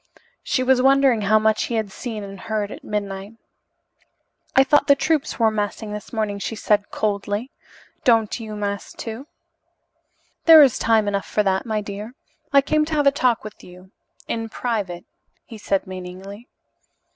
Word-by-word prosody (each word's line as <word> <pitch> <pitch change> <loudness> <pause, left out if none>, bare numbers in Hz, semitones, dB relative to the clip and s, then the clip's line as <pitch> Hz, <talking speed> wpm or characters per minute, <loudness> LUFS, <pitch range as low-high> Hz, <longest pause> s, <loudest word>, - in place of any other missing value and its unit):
She 255 - 0
was 255 0 +3
wondering 270 -3 +4
how 210 +2 +4
much 215 0 +2
he 235 - -3
had 215 -3 -2
seen 220 -1 -6
and 195 -1 -9
heard 215 -1 -3
at - - -10
midnight. 200 0 -4 1.2
"I 265 - +7
thought 290 +2 +3
the 280 - +6
troops 310 0 0
were 225 -2 +3
massing 210 0 -3
this 210 - -8
morning," 215 -3 -2
she 225 - -4
said 210 -1 +1
coldly. 205 +3 -2 0.5
"Don't 225 -2 +2
you 215 -2 -7
mass, 200 -1 -4
too?" 230 +5 -7 1.2
"There 320 -2 +10
is 265 -5 +2
time 220 -2 +2
enough 200 -1 -2
for 210 - +1
that, 190 +2 0
my 215 -1 -1
dear. 210 +4 -8 0.4
I 280 -1 +6
came 305 +2 +1
to 315 0 -3
have 295 -1 +1
a 280 - +6
talk 255 -4 +1
with 215 -1 -10
you 180 +1 -15 0.4
in 225 -1 -3
private," 205 -8 -3 0.4
he 225 - -11
said 195 -1 -1
meaningly. 190 +4 -9
215 Hz, 170 wpm, -22 LUFS, 200-245 Hz, 1.2 s, There